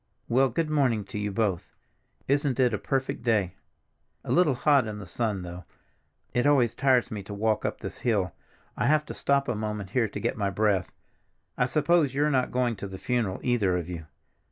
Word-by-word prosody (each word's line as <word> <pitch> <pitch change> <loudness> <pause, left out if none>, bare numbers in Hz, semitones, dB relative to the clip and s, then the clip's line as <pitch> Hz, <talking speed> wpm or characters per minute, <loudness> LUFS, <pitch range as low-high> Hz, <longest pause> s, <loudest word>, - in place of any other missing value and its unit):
Well, 130 +3 +3
good 160 +6 -1
morning 130 -8 +2
to 110 -5 -6
you 105 0 -2
both. 100 -4 -1 0.5
Isn't 140 -2 +1
it 125 -3 +3
a 105 - -1
perfect 135 +3 -2
day! 110 -7 +1 0.7
A - - -4
little 165 -7 +4
hot 140 -2 +3
in 105 -1 -5
the 105 - -8
sun 105 0 -2
though. 90 0 -8 0.7
It 125 +3 +2
always 125 -6 +4
tires 130 -2 +2
me 105 -2 -4
to 100 +1 -8
walk 110 +1 0
up - - -3
this - - -7
hill; 100 -7 0 0.4
I - - 0
have 150 +1 +3
to - - -7
stop 140 0 +1
a 120 - 0
moment 105 -2 -4
here 120 -2 +2
to 105 - -6
get - - -1
my 100 -2 0
breath. 100 -2 +1 0.6
I 125 - +1
suppose 150 0 +2
you're 150 +2 +2
not 130 -2 +1
going 125 -3 0
to 100 - -5
the 95 -1 -8
funeral, 115 -4 -1
either 105 -8 +2
of 85 -2 -4
you? 85 -3 -7
115 Hz, 205 wpm, -27 LUFS, 100-135 Hz, 0.7 s, little